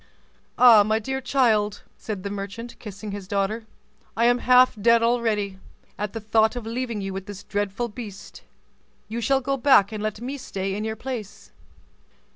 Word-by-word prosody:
"Ah! 235 -4 +8
my 215 +2 +2
dear 265 +4 -3
child," 220 -6 +1
said 205 -4 -6
the 200 - -4
merchant, 205 +4 -6
kissing 210 -1 -8
his 200 -2 -7
daughter, 205 +3 -1 0.5
"I 230 - +3
am 245 +1 +4
half 250 +1 +5
dead 230 +1 +5
already, 220 -5 0 0.4
at 210 -1 -4
the 225 - -4
thought 220 +2 +2
of 245 -2 -5
leaving 230 -2 -3
you 195 -1 -4
with 195 0 -6
this 205 -1 -8
dreadful 205 +3 -2
beast; 210 -3 -10 0.7
you 230 +2 -4
shall 270 +4 +2
go 275 +1 -1
back 240 -6 +5
and 215 -1 -5
let 215 -1 -3
me 265 +4 -5
stay 195 -6 -4
in 210 +2 -3
your 220 0 -3
place." 230 -3 -7
220 Hz, 175 wpm, -24 LUFS, 205-240 Hz, 0.7 s, Ah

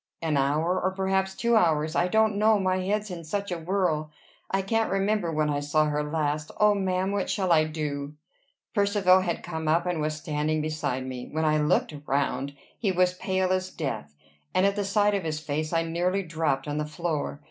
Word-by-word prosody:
"An 160 -2 -1
hour. 155 +6 +1
Or 185 - +2
perhaps 190 0 0
two 235 0 +2
hours. 160 -5 +2
I 175 - +3
don't 220 +2 +3
know, 215 +1 +4
my 185 -1 +1
head's 205 +2 -1
in 170 -2 -6
such 200 +4 -3
a 175 - -2
whirl. 165 -3 0 0.4
I 195 0 0
can't 225 +3 +1
remember 195 -2 0
when 155 -1 +1
I 145 -1 0
saw 145 +2 +2
her 150 0 0
last. 150 0 -1
O 210 0 +6
ma'am! 190 -1 0
What 200 -1 -1
shall 190 -3 0
I 155 -2 +5
do?" 150 -2 -4 0.6
Percivale 200 -3 +4
had 175 -2 -2
come 160 -2 -4
up, 165 +3 +2
and 175 -3 -1
was 155 0 -1
standing 155 0 -1
beside 150 -4 -2
me. 125 -1 -6
When 160 +1 0
I 155 0 +3
looked 150 +1 +1
round, 140 0 -1 0.2
he 205 -5 +1
was 180 0 +3
as 180 - -16
pale 185 -1 0
as 185 0 -1
death; 105 - -5 0.4
and 185 - +4
at 200 0 +2
the 205 -1 -1
sight 205 +1 +2
of 200 -2 0
his 155 -1 -2
face, 155 0 -3
I 165 -1 +2
nearly 175 +4 0
dropped 155 -5 -1
on 145 +1 -2
the 150 - -1
floor. 155 -3 -3
170 Hz, 210 wpm, -27 LUFS, 150-190 Hz, 0.6 s, O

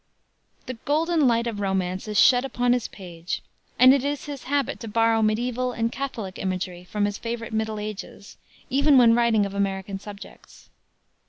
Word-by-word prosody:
The 255 - -5
golden 315 0 +2
light 235 -1 +2
of 225 -3 -3
romance 190 -1 -2
is 210 -1 +1
shed 245 -1 +6
upon 245 -2 +1
his 245 -3 -1
page, 175 -3 -7 0.3
and 255 +2 +8
it 275 -2 +1
is 285 0 -3
his 285 -3 -7
habit 280 -1 -1
to 230 - -7
borrow 225 +1 +2
mediaeval 245 +3 0
and 230 0 -1
Catholic 230 -9 -5
imagery 185 -1 -3
from 205 +3 -1
his 205 0 -3
favorite 230 -1 -5
middle 220 -1 -2
ages, 210 -1 -8 0.4
even 280 +1 +4
when 235 -2 +7
writing 230 -3 +3
of 200 - -6
American 195 0 -2
subjects. 205 0 -13
225 Hz, 170 wpm, -24 LUFS, 200-250 Hz, 0.4 s, and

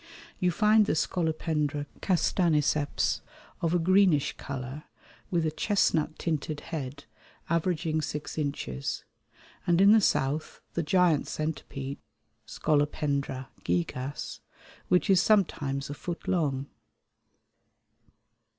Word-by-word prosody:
You 180 - +3
find 210 +4 +4
the - - +2
Scolopendra 155 -3 0 0.2
castaniceps 155 -5 +1 0.4
of 170 +1 +1
a - - +5
greenish 180 -3 +3
colour 135 +2 -6 0.4
with 170 -3 +1
a 155 - +1
chestnut 160 -4 +1
tinted 155 -2 -2
head 140 -3 -6 0.5
averaging 165 -2 +1
six 150 0 -4
inches, 140 - -3 0.6
and 175 0 +4
in 200 +1 +7
the 220 0 +7
south 150 -4 0
the 170 - 0
giant 170 -2 +3
centipede 140 -3 -4 0.5
(Scolopendra 140 -3 0
gigas) 125 +11 -2 0.5
which 180 +2 +3
is 190 -3 +5
sometimes 150 -10 +1
a 145 - -5
foot 170 +3 -6
long. 140 -7 0
155 Hz, 105 wpm, -28 LUFS, 140-175 Hz, 0.6 s, in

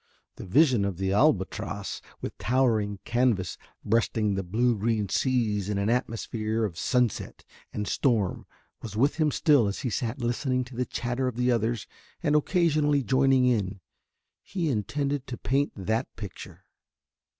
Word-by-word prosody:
The - - -8
vision 125 - +4
of 100 -3 -2
the 95 +1 0
Albatross 105 -4 0 0.2
with - - -5
towering 115 -5 +1
canvas 120 -6 +1 0.3
breasting 110 -1 +1
the 95 - -1
blue 115 +6 +1
green 105 -1 0
seas 105 -4 0
in 105 - -1
an 100 +3 +1
atmosphere 115 -2 -1
of 95 -6 -5
sunset 125 +4 -1 0.3
and 105 -1 -3
storm 110 -8 0 0.3
was 105 -2 -7
with 140 +7 +2
him 155 -2 +3
still 145 -6 +3
as 100 - -3
he 125 - -2
sat 120 +4 -2
listening 130 +1 0
to 125 0 -12
the 125 +1 -1
chatter 125 +2 -2
of 125 - -3
the 125 +1 +2
others 115 -2 0 0.4
and 150 - +2
occasionally 150 -3 +2
joining 130 +2 +3
in. 100 -6 0 0.6
He 175 -5 -2
intended 140 +5 -2
to 120 - -5
paint 140 +2 0
that 110 +5 -1
picture. 100 -4 -9
120 Hz, 150 wpm, -27 LUFS, 105-130 Hz, 0.6 s, vision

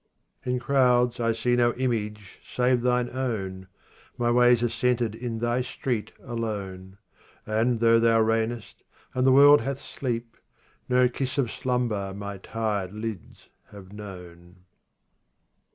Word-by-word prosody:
25 - - -9
In - - -1
crowds 125 -2 +2
I 115 -1 +2
see 115 +2 0
no 120 -1 +2
image 105 -5 -3
save 125 0 +1
thine 125 0 +1
own, 95 -8 -4 0.5
My 120 -1 +1
ways 120 0 +4
are 120 - +2
centred 120 -1 0
in 115 0 -5
thy 120 +2 0
street 125 -2 -3
alone; 100 -6 -5 0.5
And 115 +2 +1
though 115 0 +5
thou 115 0 +4
reignest, 115 0 -2 0.3
and 130 +1 +1
the - - +6
world 145 +2 +7
hath 135 0 -3
sleep, 120 -4 -5 0.5
No 125 0 +4
kiss 130 +2 -4
of 125 -5 0
slumber 115 -6 -2
my 100 -1 -6
tired 105 -2 -3
lids 110 -5 -7 0.2
have 100 -1 -13
known. 90 -3 -11
115 Hz, 135 wpm, -26 LUFS, 105-125 Hz, 0.5 s, world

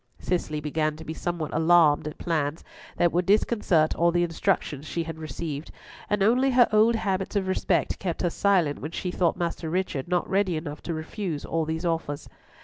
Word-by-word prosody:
Cicely 170 -4 -2
began 155 +1 -1
to 160 - -10
be 160 - -4
somewhat 170 -2 -3
alarmed 160 -2 +4
at 150 - -7
plans 155 -2 -2 0.3
that 175 - +3
would 175 +2 0
disconcert 200 -6 +3
all 170 0 +2
the 175 0 +2
instructions 165 -4 -1
she 170 - -2
had 160 -1 -7
received, 155 -1 -5 0.4
and 205 -1 +1
only 250 +6 +4
her 245 -2 +5
old 220 +2 +5
habits 195 -2 -2
of 195 -2 0
respect 185 -3 0
kept 175 -3 -3
her 175 - +1
silent 180 -8 +2
when 155 - -5
she 180 +2 -4
thought 175 -2 +1
Master 170 -1 -3
Richard 170 -6 -2
not 180 0 0
ready 190 -3 +1
enough 150 -1 -6
to 165 - -1
refuse 155 0 -4
all 165 -1 -1
these 160 +2 -3
offers. 165 -4 -2
170 Hz, 190 wpm, -26 LUFS, 155-190 Hz, 0.4 s, her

